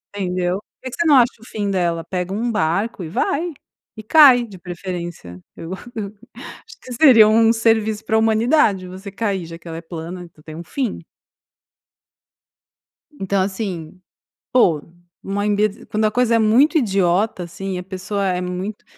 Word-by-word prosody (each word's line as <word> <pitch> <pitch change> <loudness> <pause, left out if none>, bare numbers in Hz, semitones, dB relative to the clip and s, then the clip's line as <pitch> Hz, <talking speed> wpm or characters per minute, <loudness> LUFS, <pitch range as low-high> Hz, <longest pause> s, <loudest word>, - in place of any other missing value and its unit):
Entendeu? 180 -1 -1
Por - - -30
que 255 - -5
que - - -7
você - - +2
não 290 - +6
acha 245 -1 +5
o 225 - -14
fim 205 -4 -3
dela? 170 -3 0
Pega 180 +2 -4
um 230 +3 -1
barco 195 +2 -1
e 160 - -6
vai 320 - -1 0.4
e 215 - -9
cai, 260 -1 +7
de 200 -4 -12
preferência. 175 - -7 0.2
Eu 165 +2 -8 0.2
eu 205 -3 -4 0.6
acho 445 - -14
que 255 - -10
seria 235 -5 +7
um 225 +1 +4
serviço 220 -2 +1
para 220 - +1
a - - +4
humanidade 220 -3 +2
você 190 +2 -9
cair, 195 -4 -2
já 165 0 -9
que 170 - -22
ela 165 0 -6
é - - -6
plana. 170 +2 -7
Então, 155 -3 -18
tem 155 - -9
um 170 - -7
fim. 245 +2 -3 2.1
Então, 195 -7 -1
assim, 185 -4 -4 0.5
pô, 170 -12 +3 0.4
uma 200 +1 -2
imbe 210 0 0
quando 215 +1 -1
a 215 - +2
coisa 240 0 +2
é - - +3
muito 245 +10 +4
idiota, 195 - +1
assim, 190 +2 -5
a 180 - -5
pessoa 190 +2 -4
é 180 -1 0
muito 180 +3 -5
200 Hz, 175 wpm, -20 LUFS, 180-225 Hz, 2.1 s, cai